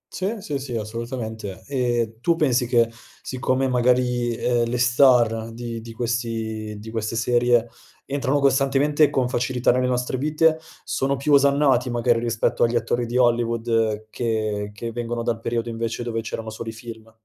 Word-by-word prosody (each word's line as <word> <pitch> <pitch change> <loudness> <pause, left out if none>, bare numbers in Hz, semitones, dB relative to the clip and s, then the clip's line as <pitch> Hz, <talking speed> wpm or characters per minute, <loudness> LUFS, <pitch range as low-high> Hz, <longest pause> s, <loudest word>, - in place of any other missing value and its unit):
C 195 +5 -2
sì, 145 -6 -3
sì, 130 -3 -5
assolutamente, 110 -2 -5
e 120 -5 -1
tu 170 +4 +2
pensi 130 -6 +1
che 120 -1 +3 0.4
siccome 130 0 0
magari, 125 -1 +1
ehm, 120 0 +1
le 125 - -1
star 120 -2 +4
di 115 0 -6
di 115 0 -10
questi 115 -2 -3
di 110 +2 -9
queste 110 0 -3
serie, 120 0 +2 0.4
entrano 140 0 0
costantemente 140 +2 +3
con 130 -2 0
facilità 125 0 +1
nelle 125 +1 +1
nostre 125 0 -1
vite, 155 +2 +2 0.2
sono 135 +1 -1
più 145 +2 +1
osannati 140 -2 +4
magari 120 -1 +2
rispetto 115 -1 0
agli 120 0 +2
attori 120 +1 0
di 120 +2 -2
Hollywood 115 -3 +1
che 110 -3 -2
che 115 +3 -6
vengono 120 0 -3
dal 115 -1 -1
periodo 115 0 -2
invece 115 +1 -3
dove 115 -1 -2
c'erano 110 0 -5
solo 115 +1 -6
i - - -6
film? 115 -1 -10
120 Hz, 160 wpm, -23 LUFS, 115-130 Hz, 0.4 s, star